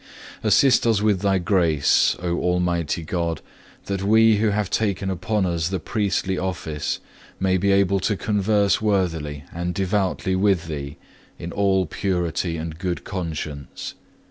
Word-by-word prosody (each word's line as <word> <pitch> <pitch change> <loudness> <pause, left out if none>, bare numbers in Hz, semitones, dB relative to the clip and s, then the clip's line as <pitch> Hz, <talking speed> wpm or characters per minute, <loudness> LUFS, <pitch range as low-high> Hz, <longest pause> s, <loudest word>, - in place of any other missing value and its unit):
Assist 115 +4 +4
us 110 -3 +3
with 105 -3 +1
Thy 100 -1 +2
grace, 85 -5 +3
O 85 -1 0
Almighty 90 -2 0
God, 85 -1 -2 0.5
that 100 -1 -2
we 110 +2 +5
who 110 +1 +2
have 105 -2 -1
taken 100 -3 0
upon 95 +3 -1
us 85 -2 0
the 95 -1 -2
priestly 95 -1 -1
office, 80 -5 -3 0.4
may 95 -1 +2
be 100 +2 +2
able 100 0 +3
to 100 +2 0
converse 105 0 +1
worthily 80 -9 -1
and 90 +1 -3
devoutly 95 -1 0
with 95 -3 +2
Thee 70 -3 -6 0.4
in 85 0 -6
all 95 -1 +2
purity 85 -1 -2
and 80 0 -6
good 90 -1 -3
conscience. 80 -6 -5
95 Hz, 145 wpm, -23 LUFS, 85-100 Hz, 0.5 s, we